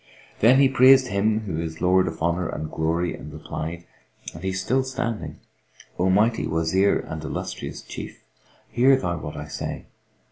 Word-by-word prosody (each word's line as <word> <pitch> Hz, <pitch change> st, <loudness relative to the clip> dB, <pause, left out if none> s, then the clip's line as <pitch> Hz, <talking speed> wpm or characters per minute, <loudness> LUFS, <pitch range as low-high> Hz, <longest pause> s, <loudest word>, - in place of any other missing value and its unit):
Then 125 Hz, +5 st, +6 dB
he 140 Hz, -, +6 dB
praised 130 Hz, 0 st, +6 dB
Him 105 Hz, +2 st, +1 dB
who 90 Hz, -7 st, -3 dB
is 80 Hz, -1 st, -5 dB
the 85 Hz, -, -3 dB
Lord 95 Hz, +1 st, +4 dB
of 80 Hz, 0 st, -5 dB
Honour 85 Hz, +1 st, 0 dB
and 75 Hz, 0 st, -5 dB
Glory 85 Hz, +2 st, -1 dB
and -, -, -10 dB
replied 85 Hz, +2 st, -6 dB, 0.5 s
(and 80 Hz, -, -10 dB
he 95 Hz, -, -1 dB
still 105 Hz, +8 st, 0 dB
standing), 120 Hz, -4 st, -4 dB, 0.6 s
"O 90 Hz, +2 st, +2 dB
mighty 110 Hz, +5 st, +2 dB
Wazir 85 Hz, +5 st, +2 dB
and 80 Hz, -1 st, -6 dB
illustrious 80 Hz, -, -5 dB
Chief; -, -, -9 dB, 0.5 s
hear 130 Hz, +3 st, +5 dB
thou 90 Hz, -9 st, -2 dB
what 75 Hz, -1 st, -7 dB
I 75 Hz, 0 st, -6 dB
say! -, -, -5 dB
95 Hz, 170 wpm, -24 LUFS, 80-115 Hz, 0.6 s, Then